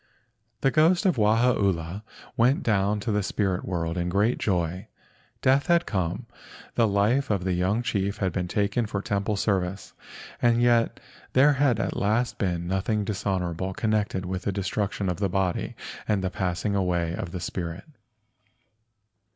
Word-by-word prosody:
The 135 - +3
ghost 170 +6 +3
of 180 -8 +3
Wahaula 105 -5 +2 0.3
went 125 +3 +3
down 105 -1 +1
to 110 - -2
the 105 0 +1
spirit 95 -2 -1
world 85 -1 -2
in 90 0 -1
great 105 +6 +1
joy. 90 -2 -1 0.6
Death 135 +2 +3
had 170 0 +3
come. 95 +3 -2 0.5
The 115 -2 +3
life 105 +7 +2
of 100 -4 0
the 95 0 0
young 95 +6 +1
chief 100 -3 -1
had 95 -3 0
been 90 +1 -2
taken 105 +4 0
for 105 -1 -3
temple 100 +1 -1
service 95 -2 -1 0.5
and 120 -1 +4
yet 120 -1 +3 0.3
there 140 +3 +6
had 135 -5 +2
at - - -1
last 110 +4 0
been 90 -4 -1
nothing 100 +3 0
dishonorable 95 -3 -2
connected 105 -4 0
with 95 +1 -3
the 100 - -1
destruction 100 +1 -2
of 90 -2 -1
the 100 -2 +1
body 95 -1 -1 0.3
and 100 -3 +1
the 95 - -1
passing 90 +2 -1
away 90 -3 0
of 90 -1 -5
the 90 - -4
spirit. 85 +1 -4
100 Hz, 160 wpm, -26 LUFS, 90-110 Hz, 0.6 s, there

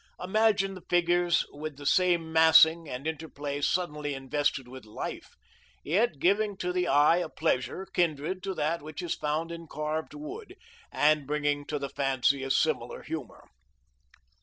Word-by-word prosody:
Imagine 200 0 +2
the 185 - -10
figures 175 0 +2
with 150 -1 -7
the 145 - -10
same 170 -1 +2
massing 160 0 +6
and 125 +3 -6
interplay 145 -3 -4
suddenly 150 -3 -1
invested 135 0 -1
with 130 +1 -10
life, 105 0 -7 0.5
yet 180 +1 +1
giving 200 +6 +1
to 180 -1 -2
the 180 0 0
eye 145 +4 +5
a 180 - -2
pleasure 160 +4 -1
kindred 170 +1 -1
to 195 -1 -4
that 160 +1 -1
which 155 +4 -7
is 170 - -1
found 155 +3 -2
in 165 -1 -8
carved 155 - -4
wood, 370 +7 -8 0.4
and 150 -1 +2
bringing 145 -1 -1
to 150 - -2
the 140 -1 -4
fancy 135 0 +1
a 135 - -4
similar - - 0
humor. - - -7
160 Hz, 155 wpm, -28 LUFS, 145-180 Hz, 0.5 s, massing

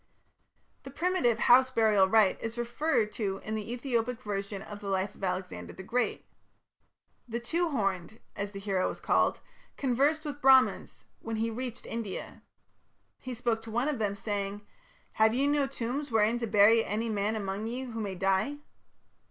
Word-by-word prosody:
The - - -10
primitive 280 -6 +1
house 255 +2 +6
burial 220 -6 +4
rite 210 -1 +3
is 225 +1 -4
referred 240 -1 0
to 195 -4 -2
in 220 - -4
the 215 +1 -4
Ethiopic 245 -1 -1
version 200 -1 -4
of 210 -1 -9
the 205 - -8
life 195 +1 -1
of - - -15
Alexander 185 0 -3
the 190 - -9
Great. 240 +5 -1 1.0
The 235 0 -3
"Two 335 +8 -1
horned", 195 - -2 0.2
as 200 0 -3
the 195 - -7
hero 195 -2 0
was - - -7
called, - - +2 0.4
conversed 285 +4 +1
with 290 -1 -5
Brahmans 265 -1 +4 0.2
when 225 0 -4
he 225 +1 -1
reached 250 +1 -5
India. 225 -5 -6 0.8
He 255 -1 -6
spoke 230 -1 -1
to 225 - -10
one 240 +5 0
of 295 -5 -1
them, 205 -2 0
"saying: 200 0 -3 0.5
'Have 220 +1 +3
ye 270 +2 +2
no 285 -1 +2
tombs 270 +2 -3
wherein 225 +2 +3
to 230 - -2
bury 215 +2 +5
any 220 +3 -2
man 210 +1 0
among 200 0 -3
ye 250 +3 -4
who 230 -3 -5
may 200 -3 -3
die?' 195 +9 +1
225 Hz, 170 wpm, -29 LUFS, 205-250 Hz, 1.0 s, house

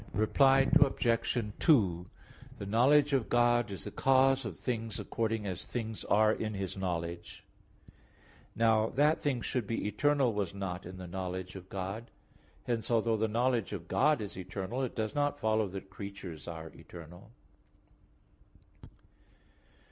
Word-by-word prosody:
Reply 135 +6 +4
Obj. 125 -4 +2 0.2
2: 95 - +3 0.5
The 100 - -6
knowledge 140 +8 +4
of 130 -5 +1
God 120 -1 +3
is 95 - -7
the - - -6
cause 135 0 +3
of 100 -7 -6
things 115 -3 -3
according 110 -2 -2
as 95 -3 -4
things 110 -2 -5
are 110 +1 +4
in 110 -1 -3
His 95 -2 -4
knowledge. 85 -3 -4 1.1
Now 110 -1 +3
that 150 +4 +3
things 130 -5 -1
should 125 -6 -2
be 115 - -2
eternal 140 +1 +2
was 100 -3 -2
not 95 -2 -5
in 95 +1 -9
the 95 - -7
knowledge 90 +1 -5
of 95 -1 -10
God; 100 +5 -5 0.5
hence 120 -3 -2
although 115 -1 +2
the 110 +1 +1
knowledge 120 -1 0
of 90 -4 -6
God 150 +3 +2
is 105 - -6
eternal, 95 +6 -4
it 130 - -3
does 110 +1 -2
not 145 -1 0
follow 110 -1 +1
that 95 0 -8
creatures 95 -7 -8
are 80 -1 -6
eternal. 85 +4 -12
110 Hz, 145 wpm, -31 LUFS, 95-125 Hz, 1.1 s, Reply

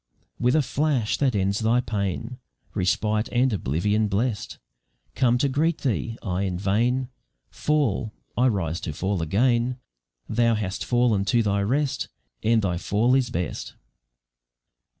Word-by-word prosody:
"With 125 +3 +3
the 155 - +4
flash 135 -5 0
that 135 -5 +1
ends 100 +1 +1
thy 115 +2 +3
pain 110 +2 -3 0.3
Respite 105 +3 0
and 125 0 +2
oblivion 105 +6 +1
blest 105 +2 -2 0.6
Come 125 -1 +3
to 140 - +2
greet 155 +5 0
thee. 115 -3 -1
I 90 -1 -1
in 95 -3 -1
vain 120 +7 +1 0.4
Fall: 135 -8 0 0.2
I 125 +2 +3
rise 85 - -1
to 80 - -4
fall 95 +3 -1
again: 120 +8 +1 0.5
Thou 115 0 +2
hast 100 -3 -3
fallen 120 -5 +2
to 120 +2 +3
thy 100 -1 +1
rest 135 +7 0 0.3
And 110 0 +3
thy 90 -3 0
fall 110 +7 +2
is 130 -2 +2
best!" 90 -9 -4
110 Hz, 140 wpm, -25 LUFS, 100-125 Hz, 0.6 s, the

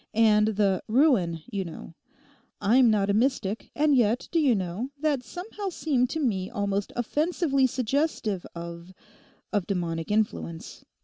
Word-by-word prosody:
And 215 -1 +5
the 195 -3 +2
"ruin," 215 - +2
you 200 -3 -2
know. 165 -1 -9 0.7
I'm 235 +4 +5
not 205 -2 +2
a - - +1
mystic; 225 -3 0
and 295 -1 +3
yet 235 -1 +2
do 335 - +2
you 275 -7 +4
know, 190 +6 -3
that 295 -3 +1
somehow 390 - -6
seemed 270 -8 0
to 320 - -3
me 195 -10 -1
almost 200 0 -2
offensively 280 +2 +1
suggestive 250 - -1
of—of 175 +3 -7
demonic 165 -4 -2
influence. 85 - -2
215 Hz, 135 wpm, -26 LUFS, 190-270 Hz, 0.7 s, And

